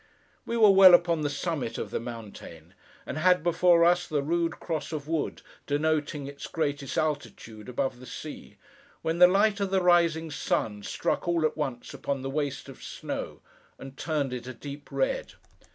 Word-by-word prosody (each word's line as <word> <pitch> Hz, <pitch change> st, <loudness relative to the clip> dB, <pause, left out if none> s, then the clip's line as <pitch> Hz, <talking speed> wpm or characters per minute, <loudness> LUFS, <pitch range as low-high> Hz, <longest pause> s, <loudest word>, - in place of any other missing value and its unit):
We 235 Hz, -, -1 dB
were 215 Hz, -3 st, +7 dB
well 190 Hz, -2 st, +9 dB
upon 170 Hz, -2 st, +1 dB
the 145 Hz, -, 0 dB
summit 145 Hz, -4 st, -3 dB
of -, -, -5 dB
the -, -, -1 dB
mountain: 105 Hz, -8 st, -9 dB, 0.3 s
and -, -, -4 dB
had 180 Hz, 0 st, +4 dB
before 175 Hz, 0 st, +4 dB
us 175 Hz, +1 st, +3 dB
the 150 Hz, -3 st, -1 dB
rude 165 Hz, +2 st, -1 dB
cross 165 Hz, -2 st, -4 dB
of 150 Hz, -2 st, -5 dB
wood, 160 Hz, -2 st, -2 dB, 0.2 s
denoting 150 Hz, 0 st, 0 dB
its 140 Hz, 0 st, -8 dB
greatest 145 Hz, -4 st, -2 dB
altitude 115 Hz, -7 st, -3 dB
above 125 Hz, 0 st, -2 dB
the 130 Hz, -, -12 dB
sea: 155 Hz, -, -9 dB, 0.5 s
when 165 Hz, +1 st, -1 dB
the 180 Hz, -, +10 dB
light 200 Hz, +3 st, +3 dB
of 200 Hz, -1 st, -1 dB
the 190 Hz, 0 st, +2 dB
rising 170 Hz, -2 st, +3 dB
sun, 105 Hz, -7 st, -1 dB
struck, 100 Hz, -, -2 dB
all 170 Hz, -2 st, +2 dB
at -, -, 0 dB
once, 135 Hz, -6 st, -4 dB
upon 140 Hz, -2 st, -3 dB
the 135 Hz, -, -3 dB
waste 145 Hz, -1 st, -3 dB
of -, -, -12 dB
snow, -, -, -6 dB, 0.4 s
and 135 Hz, 0 st, -10 dB
turned 145 Hz, -4 st, -2 dB
it 125 Hz, 0 st, -6 dB
a 130 Hz, -, -7 dB
deep 145 Hz, +2 st, -9 dB
red. -, -, -1 dB
155 Hz, 180 wpm, -27 LUFS, 135-175 Hz, 0.5 s, the